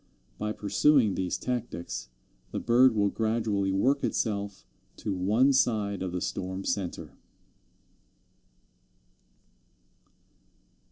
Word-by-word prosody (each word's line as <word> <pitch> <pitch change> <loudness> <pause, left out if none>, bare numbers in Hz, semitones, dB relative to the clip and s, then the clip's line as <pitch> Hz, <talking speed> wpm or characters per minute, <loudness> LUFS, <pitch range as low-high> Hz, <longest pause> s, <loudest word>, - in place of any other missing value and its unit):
By 105 0 -1
pursuing 110 +2 +3
these 90 -1 -2
tactics, 85 - -4 0.4
the - - -3
bird 120 +1 +4
will 100 -1 +2
gradually 110 -3 0
work 130 +9 +2
itself 100 -3 -2 0.3
to 105 - -3
one 110 +9 +3
side 105 -6 +1
of 95 -1 -3
the 90 0 -3
storm 95 0 -4
centre. 95 -4 -3
100 Hz, 95 wpm, -28 LUFS, 95-115 Hz, 0.4 s, bird